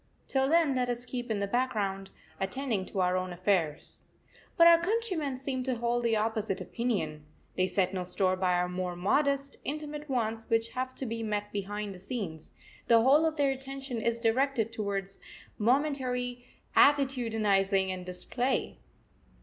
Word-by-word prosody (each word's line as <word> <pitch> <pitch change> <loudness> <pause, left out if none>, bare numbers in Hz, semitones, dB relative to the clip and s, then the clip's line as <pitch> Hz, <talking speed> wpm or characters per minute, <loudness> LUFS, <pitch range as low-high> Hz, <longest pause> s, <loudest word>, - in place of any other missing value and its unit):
Till 265 0 +1
then 325 -3 +4
let 250 -1 0
us 245 0 -1
keep 245 -1 -5
in 220 - 0
the 200 - 0
background, 200 -4 -1 0.3
attending 205 0 -1
to 195 - -2
our 180 0 +2
own 185 0 -2
affairs. 175 -4 0 0.5
But 335 - +8
our 335 0 +8
countrymen 360 - -1
seem 260 0 -3
to 260 -1 0
hold 240 +1 0
the 230 -2 +2
opposite 215 -2 -1
opinion. 180 -11 -2 0.3
They 185 0 +2
set 185 0 +1
no 185 -1 -2
store 185 +1 +1
by 185 -1 +1
our 180 0 +1
more 180 0 -3
modest, 280 +9 +1
intimate 300 0 -5
wants 225 -3 -1
which 225 0 +2
have 255 0 -4
to 270 - -4
be 230 -1 -3
met 210 -2 -2
behind 205 0 -3
the 185 - -11
scenes, 185 -7 -5 0.4
the 230 -1 +6
whole 290 +5 +5
of 315 - -2
their 280 -2 +3
attention 270 -2 -5
is 235 +1 0
directed 230 -1 +1
to 200 -3 -1 0.6
momentary 250 0 0 0.3
attitudinising 220 -9 +3
and 185 -1 -4
display. 240 +8 -2
230 Hz, 160 wpm, -30 LUFS, 195-265 Hz, 0.6 s, But